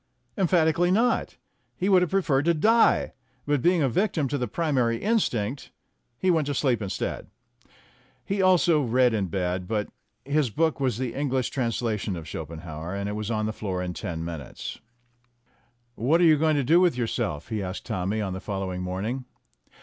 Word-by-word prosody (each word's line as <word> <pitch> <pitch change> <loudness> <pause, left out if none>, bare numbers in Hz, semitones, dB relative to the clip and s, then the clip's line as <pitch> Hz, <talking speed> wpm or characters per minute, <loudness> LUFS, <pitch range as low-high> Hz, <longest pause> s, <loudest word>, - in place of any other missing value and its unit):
Emphatically 175 -2 +3
not; 225 +6 +1 0.4
he 185 - -1
would 190 -2 +5
have 180 - +1
preferred 155 -8 +2
to 170 0 +3
die, 225 +9 +3 0.3
but 145 -2 +1
being 175 0 +3
a - - +3
victim 160 - 0
to 145 - -2
the 125 - -1
primary 130 -8 0
instinct, 135 - -1 0.5
he 185 +8 +2
went 160 -4 +1
to 145 - -1
sleep 125 -5 +1
instead. 100 -2 -3 1.0
He 195 0 -1
also 175 -4 +4
read 125 -1 +3
in 100 -3 0
bed, 90 0 -2
but 105 0 -1 0.4
his 145 -1 +1
book 160 +6 0
was 130 -5 0
the 125 -2 -3
English 135 -3 -1
translation 115 -5 -1
of 80 -2 -7
Schopenhauer, 80 +2 -6
and 100 0 -3
it - - -2
was 105 0 -4
on 110 -2 0
the 110 - -2
floor 95 -4 -3
in 90 -1 -4
ten 80 -1 -5
min 85 -2 -4
utes. 65 - -8 1.1
"What 140 +9 +2
are - - +4
you 160 -2 +7
going 155 0 +3
to 140 - +1
do 160 +7 +5
with 175 -8 +3
yourself?" 85 -10 -2
he 110 -3 -2
asked 95 0 -5
Tommy 95 +4 -2
on 95 -3 -2
the 95 - -4
following 95 -3 -4
morning. 100 +8 -3
125 Hz, 180 wpm, -26 LUFS, 100-160 Hz, 1.1 s, you